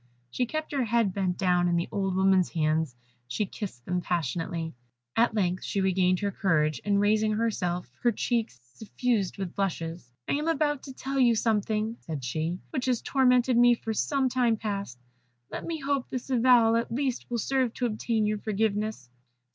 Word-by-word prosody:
She 250 - -1
kept 310 +4 -4
her 275 -4 0
head 225 -3 +1
bent 185 -2 -1
down 180 -1 +2
in 175 - +1
the 170 +1 0
old 195 -2 -1
woman's 190 -1 +3
hands; 155 -4 0 0.3
she 210 - -1
kissed 190 - -7
them 180 0 -1
passionately. 165 0 -2 0.4
At 230 -1 +3
length 185 -3 0
she 200 - -2
regained 185 -1 +2
her 200 -1 0
courage, 155 - +1
and 200 -1 +2
raising 215 +1 +2
herself, 185 -6 -1
her 240 - +3
cheeks 230 - -1
suffused 220 - -1
with 190 -3 -4
blushes, 170 -7 -3 0.2
"I - - 0
am 300 +3 -1
about 295 -3 +1
to 265 - -8
tell 270 +1 -3
you 240 -3 +5
something," 220 0 0
said 155 -5 -6
she, 160 +7 -2
"which 255 - -2
has 250 -3 +2
tormented 250 -2 +3
me 240 0 +6
for 225 -1 -4
some 270 +4 +1
time 245 -3 +2
past. 200 - -4 0.5
Let - - -5
me 330 -2 -3
hope 275 -2 -1
this 255 +1 -5
avowal 235 -2 +5
at 230 0 -2
least 260 0 -2
will 240 - -1
serve 260 +1 +1
to 250 - -1
obtain 220 -1 0
your 210 0 0
forgiveness." 215 - -1
215 Hz, 180 wpm, -28 LUFS, 180-245 Hz, 0.5 s, me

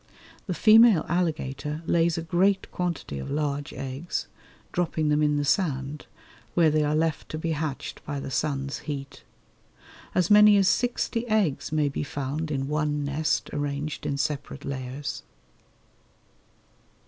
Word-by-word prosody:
The 180 - -2
female 220 -4 +6
alligator 155 -3 -2
lays 170 0 +2
a 165 - -2
great 190 +3 +1
quantity 170 - -3
of 65 - -6
large 145 -1 -2
eggs, 135 +6 -4 0.5
dropping 160 -3 0
them 150 0 +3
in 150 -1 +2
the 145 - 0
sand, 145 -4 -1 0.5
where 165 -3 +5
they 155 0 +2
are 150 +1 +1
left 160 0 -1
to 155 - -4
be 165 +1 -2
hatched 150 -3 -4
by 145 -1 -4
the 135 - -6
sun's 140 +1 -1
heat. 140 -1 -6 0.9
As 180 +1 +2
many 210 0 +8
as 195 -2 +4
sixty 245 0 0
eggs 205 - +1
may 155 -2 +2
be 140 - -3
found 145 +2 -3
in 135 -2 -2
one 150 -1 -1
nest 145 +2 -1
arranged 145 +1 -3
in 140 - -1
separate 140 0 -3
layers. 135 +1 -4
150 Hz, 145 wpm, -26 LUFS, 140-170 Hz, 0.9 s, many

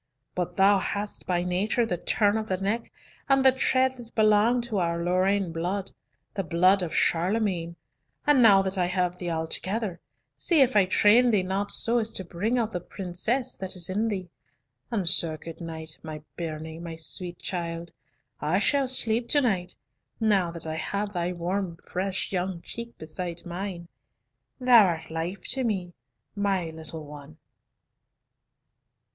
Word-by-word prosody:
But 180 +2 -3
thou 195 +1 +5
hast 205 +2 -2
by 175 -1 +1
nature 195 +6 +1
the 185 - -1
turn 205 +4 +1
of 220 -1 -2
the 185 - 0
neck, 205 +5 -2 0.4
and 270 0 +4
the 265 - +9
tread 260 0 +2
that 235 -1 -12
belong 215 +2 +4
to 230 -4 -2
our 170 -1 0
Lorraine 185 +1 +1
blood, 180 +4 -2 0.4
the 195 - -2
blood 185 +4 +3
of 175 -3 -3
Charlemagne, 175 -1 +1 0.5
and 295 -3 +5
now 200 -4 +7
that 190 0 -1
I 175 - +2
have 180 -1 -1
thee 175 - -3
altogether, 175 +4 -2 0.3
see 330 -5 +3
if 260 -2 +4
I 200 -2 +6
train 215 +6 +5
thee 210 -5 +3
not 195 +2 -2
so 235 +1 +2
as 225 0 -2
to 190 - -4
bring 200 +8 -1
out 225 -2 0
the 180 - -2
princess 215 +9 -2
that 190 0 -4
is 180 0 +1
in 215 +4 0
thee; 190 -4 -3 0.6
and 205 -7 -1
so, 165 -1 +3
good 165 +2 -10
night, 160 -1 -6
my 155 -1 -8
bairnie, 160 -1 -5
my 170 -1 -6
sweet 175 +2 -5
child; 170 -2 -4 0.5
I 155 +5 +1
shall 270 +7 +2
sleep 235 -2 +1
to 290 - +4
night, 185 -8 0 0.4
now 200 -6 +2
that 170 -1 -4
I 160 0 -3
have 200 +4 -3
thy 175 0 -1
warm 180 0 -3
fresh 190 +2 -3
young 180 -2 -2
cheek 235 0 -7
beside 170 +2 -4
mine. 175 0 -5 0.7
Thou 250 -3 +7
art 165 -4 -2
life 170 +4 -3
to 265 - +1
me, 190 -6 -2 0.4
my 195 -5 0
little 160 0 -8
one." 145 +1 -11
185 Hz, 165 wpm, -27 LUFS, 170-215 Hz, 0.7 s, the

